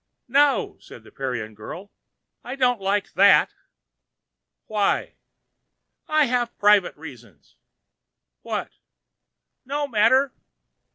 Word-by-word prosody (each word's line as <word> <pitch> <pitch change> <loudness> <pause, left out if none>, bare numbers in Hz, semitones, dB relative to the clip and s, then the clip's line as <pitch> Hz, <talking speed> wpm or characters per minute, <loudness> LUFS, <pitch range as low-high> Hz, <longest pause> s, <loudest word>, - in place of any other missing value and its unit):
"No," 280 +3 +2
said - - -14
the - - -17
Parian 125 -5 -5
girl, 170 - -10 0.5
"I 250 - -6
don't 245 -5 +1
like 200 +1 -1
that." 200 - +5 1.1
"Why?" 210 -2 -1 0.9
"I 310 -1 +3
have 240 -1 -2
private 205 -5 +3
reasons." 120 - -14 0.9
"What?" - - -4 0.9
"No 285 +2 -3
matter." 260 +3 +3
210 Hz, 95 wpm, -23 LUFS, 160-260 Hz, 1.1 s, that